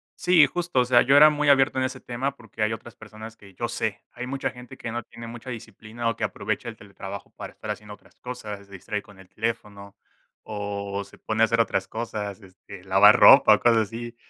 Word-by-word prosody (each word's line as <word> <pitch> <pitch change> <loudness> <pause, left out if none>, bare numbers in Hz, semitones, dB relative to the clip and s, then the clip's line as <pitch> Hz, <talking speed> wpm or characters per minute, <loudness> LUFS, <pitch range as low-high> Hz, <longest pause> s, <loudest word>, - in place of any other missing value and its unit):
Sí, 180 -4 +5
justo, 175 -6 -1
o 125 - +3
sea, 120 -1 +5
yo 135 +3 +4
era 150 +2 +9
muy 150 -1 -1
abierto 135 -1 +4
en 130 - +1
ese 130 0 -5
tema 130 +3 -4
porque 110 -1 -6
hay 110 +1 +1
otras 115 +1 -10
personas 110 +1 -11
que 100 -2 -17
yo 120 +6 -3
sé, 110 -3 -3
hay 125 - -6
mucha 135 +2 -3
gente 125 -1 -12
que 115 - -6
no 120 0 -4
tiene 115 0 -11
mucha 120 +2 -9
disciplina 115 +1 -5
o 115 - -2
que - - -6
aprovecha 110 +3 -3
el 115 - -9
teletrabajo 100 -1 -9
para - - -9
estar 110 - -10
haciendo 105 0 -6
otras - - -19
cosas, 105 -5 -7
se 100 - -24
distrae 100 +2 -5
con 100 -2 -18
el 90 -1 -16
teléfono 105 -3 -5 0.5
o, 100 -1 -5
se - - -17
pone 110 +1 0
a - - +8
hacer 115 +1 0
otras 95 -4 0
cosas, 105 -3 -5
este, 95 -1 -14
lavar 95 +2 +6
ropa 135 -5 +8
o - - -5
cosas 120 -1 +4
así. 120 +1 -7
110 Hz, 225 wpm, -25 LUFS, 105-120 Hz, 0.5 s, era